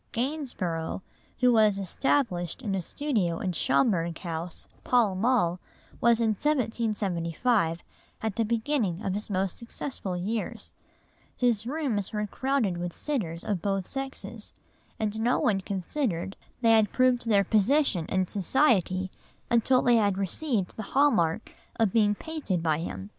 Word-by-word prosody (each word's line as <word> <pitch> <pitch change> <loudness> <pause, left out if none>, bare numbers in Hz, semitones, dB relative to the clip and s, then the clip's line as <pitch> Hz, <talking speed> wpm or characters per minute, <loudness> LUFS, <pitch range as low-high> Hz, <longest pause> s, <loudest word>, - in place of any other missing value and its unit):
Gainsborough, 230 - -2 0.4
who 250 -1 +5
was 215 -3 +4
established 195 - 0
in 205 -4 -2
a 190 - 0
studio 200 - -1
in 185 - -2
Schomberg 170 -2 +1
House, 170 -1 -6 0.2
Pall 235 -6 +3
Mall, 185 -4 +1 0.4
was 235 0 +4
in 230 -1 +2
1775 215 - 0 0.4
at 220 -3 -1
the 230 - +1
beginning 220 - -1
of 190 - 0
his 210 +2 -4
most 190 -2 -1
successful 230 -5 -4
years; 210 +5 -4 0.6
his 235 -3 +1
rooms 255 -10 -2
were 210 0 -1
crowded 245 -4 0
with 175 0 -5
sitters 180 - -3
of 200 -5 -2
both 195 -1 -1
sexes, 270 0 -6 0.4
and 215 0 -1
no 240 +3 +2
one 200 -4 +1
considered 195 - -2 0.3
they 230 -2 +5
had 220 -2 +4
proved 255 -2 +2
their 205 -3 +4
position 215 - +2
in 190 0 +1
society 190 - +2 0.4
until 240 +2 +4
they 240 -1 +5
had 200 -3 +2
received 200 - -1
the - - -5 0.2
hall 290 +1 +6
mark 170 0 0 0.2
of 220 -4 +1
being 210 -2 +3
painted 290 - -3
by 155 -2 +1
him. 95 - -6
210 Hz, 140 wpm, -27 LUFS, 185-245 Hz, 0.6 s, hall